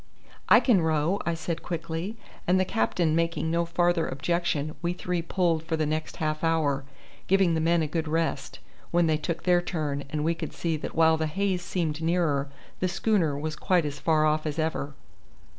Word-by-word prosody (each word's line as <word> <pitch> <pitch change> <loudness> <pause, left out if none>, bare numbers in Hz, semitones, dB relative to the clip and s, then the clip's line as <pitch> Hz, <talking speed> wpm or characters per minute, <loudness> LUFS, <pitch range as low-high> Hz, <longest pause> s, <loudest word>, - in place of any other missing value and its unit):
"I - - +9
can 220 -9 +3
row," 160 +4 +1
I 170 - +1
said 165 0 -4
quickly; 165 +5 -4 0.3
and 185 +1 +4
the 185 - +2
captain 155 +6 +1
making 165 -1 0
no 170 0 +1
farther 175 0 +1
objection, 155 +1 -1
we 175 0 0
three 180 -1 -2
pulled 170 -1 +1
for 160 0 -2
the 155 - +1
next 155 +1 -3
half 155 0 -2
hour, 150 -4 +1 0.4
giving 190 -3 +4
the 160 - +1
men 165 0 +3
a - - -1
good 160 +1 -2
rest, 165 +1 -1 0.3
when 175 0 +3
they 155 -1 +2
took 165 +2 -4
their 180 -1 +4
turn, 150 -5 -3
and 150 +1 -2
we 165 +2 +2
could - - -6
see 165 -2 -1
that 155 - -6
while 160 0 +5
the 160 0 -1
haze 190 +3 -1
seemed 165 -3 -2
nearer 160 -4 +1 0.3
the 185 - +1
schooner 175 -5 +1
was 155 +1 -3
quite 175 +1 +1
as 145 -1 -4
far 155 -2 +2
off 155 0 +1
as 150 - -3
ever. 155 -3 -2
165 Hz, 195 wpm, -27 LUFS, 155-175 Hz, 0.4 s, I